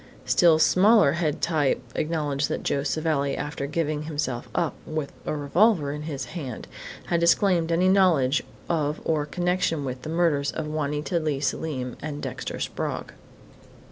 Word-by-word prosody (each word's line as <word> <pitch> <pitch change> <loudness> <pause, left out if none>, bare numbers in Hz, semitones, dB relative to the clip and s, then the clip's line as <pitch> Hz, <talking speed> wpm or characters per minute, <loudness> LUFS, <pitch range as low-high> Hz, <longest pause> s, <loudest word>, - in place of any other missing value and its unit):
Still 170 -3 +5
smaller 195 0 +5
head 155 -1 -1
type 155 -5 +2
acknowledged 150 -3 -1
that - - -3
Joe 140 - 0
Savelli, 145 -1 0
after 145 -1 -4
giving 150 0 -1
himself 145 -6 -3
up, 170 -3 +1
with 155 -3 -4
a - - -1
revolver 155 +2 +2
in 150 +1 -5
his 145 -3 -4
hand, 135 -10 -6 0.4
had 170 - +1
disclaimed 170 0 +3
any 175 +3 +3
knowledge 175 -8 +4 0.3
of 150 -3 0
or 150 -2 0
connection 175 -3 0
with 130 -1 -5
the 155 - -7
murders 160 -4 +1
of 160 - -4
Juanita 150 +1 -1
Leigh 155 -4 -1
Selim 130 -2 -3
and 145 -1 -5
Dexter 130 -2 -5
Sprague. - - -4
155 Hz, 150 wpm, -25 LUFS, 140-170 Hz, 0.4 s, Still